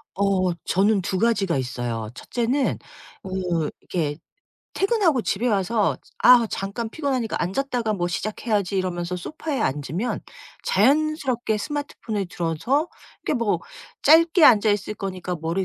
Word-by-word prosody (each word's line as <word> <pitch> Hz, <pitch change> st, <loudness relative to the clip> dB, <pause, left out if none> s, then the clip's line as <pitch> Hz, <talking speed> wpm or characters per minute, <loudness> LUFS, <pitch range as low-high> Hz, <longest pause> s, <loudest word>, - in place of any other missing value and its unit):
어 190 Hz, -2 st, +2 dB
저는 200 Hz, +2 st, +3 dB
2 185 Hz, +1 st, -2 dB
가지가 200 Hz, -7 st, +2 dB
있어요. 120 Hz, -4 st, -3 dB
1 -, -, -12 dB
째는 250 Hz, +3 st, 0 dB, 0.4 s
그 180 Hz, -4 st, -2 dB
이렇게 150 Hz, -5 st, -2 dB, 0.6 s
퇴근하고 390 Hz, -, +2 dB
집에 215 Hz, +4 st, -1 dB
와서 210 Hz, 0 st, +1 dB, 0.2 s
'아 245 Hz, -2 st, +7 dB
잠깐 220 Hz, +4 st, -4 dB
피곤하니까 260 Hz, -6 st, -2 dB
앉았다가 235 Hz, +3 st, -1 dB
뭐 175 Hz, -3 st, -1 dB
시작해야지.' 205 Hz, +1 st, -1 dB
이러면서 180 Hz, -1 st, -2 dB
소파에 285 Hz, -, -4 dB
앉으면 155 Hz, -, -2 dB, 0.4 s
자연스럽게 260 Hz, -1 st, +2 dB
스마트폰을 225 Hz, -, -4 dB
들어서 185 Hz, -, -1 dB, 0.3 s
이렇게 -, -, 0 dB
뭐 205 Hz, -7 st, +1 dB, 0.4 s
'짧게 325 Hz, +2 st, +6 dB
앉아 215 Hz, -4 st, +6 dB
있을 205 Hz, +1 st, -1 dB
거니까 185 Hz, -3 st, -4 dB
머리 170 Hz, +4 st, -1 dB
205 Hz, 305 characters per minute, -23 LUFS, 180-250 Hz, 0.6 s, 아